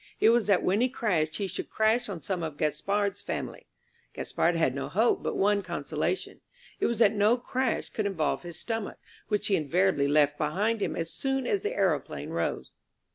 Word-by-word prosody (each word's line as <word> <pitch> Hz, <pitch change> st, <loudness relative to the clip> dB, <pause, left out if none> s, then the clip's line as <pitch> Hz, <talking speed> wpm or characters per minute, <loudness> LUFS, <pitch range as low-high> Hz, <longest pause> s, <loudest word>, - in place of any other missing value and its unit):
It 220 Hz, -, +6 dB
was 235 Hz, -2 st, +2 dB
that 200 Hz, -3 st, +3 dB
when 195 Hz, +5 st, +2 dB
he 255 Hz, -, +3 dB
crashed 165 Hz, -11 st, 0 dB
he 200 Hz, -, -2 dB
should 190 Hz, -, -5 dB
crash 220 Hz, +2 st, +1 dB
on 170 Hz, -7 st, -6 dB
some 185 Hz, +1 st, -2 dB
of 155 Hz, -3 st, -4 dB
Gaspard's 200 Hz, +7 st, 0 dB
family. -, -, -5 dB, 0.5 s
Gaspard 170 Hz, +1 st, 0 dB
had 160 Hz, -6 st, +2 dB
no 140 Hz, 0 st, -4 dB
hope, 225 Hz, +6 st, +2 dB
but -, -, -2 dB
one 205 Hz, +1 st, +3 dB
consolation. -, -, -3 dB, 0.4 s
It -, -, +2 dB
was 235 Hz, -, -1 dB
that 220 Hz, -2 st, +5 dB
no 210 Hz, +3 st, +3 dB
crash 255 Hz, 0 st, -1 dB
could 215 Hz, -2 st, -2 dB
involve 165 Hz, -7 st, -1 dB
his 170 Hz, -2 st, -7 dB
stomach, 225 Hz, -3 st, -4 dB, 0.3 s
which 210 Hz, -1 st, 0 dB
he 205 Hz, -, +3 dB
invariably 160 Hz, 0 st, +2 dB
left 145 Hz, 0 st, +3 dB
behind 205 Hz, +9 st, 0 dB
him -, -, -1 dB
as 165 Hz, 0 st, -3 dB
soon 270 Hz, -1 st, -1 dB
as 400 Hz, +9 st, 0 dB
the 430 Hz, +4 st, -2 dB
aeroplane -, -, -1 dB
rose. -, -, -2 dB
200 Hz, 190 wpm, -28 LUFS, 165-225 Hz, 0.5 s, It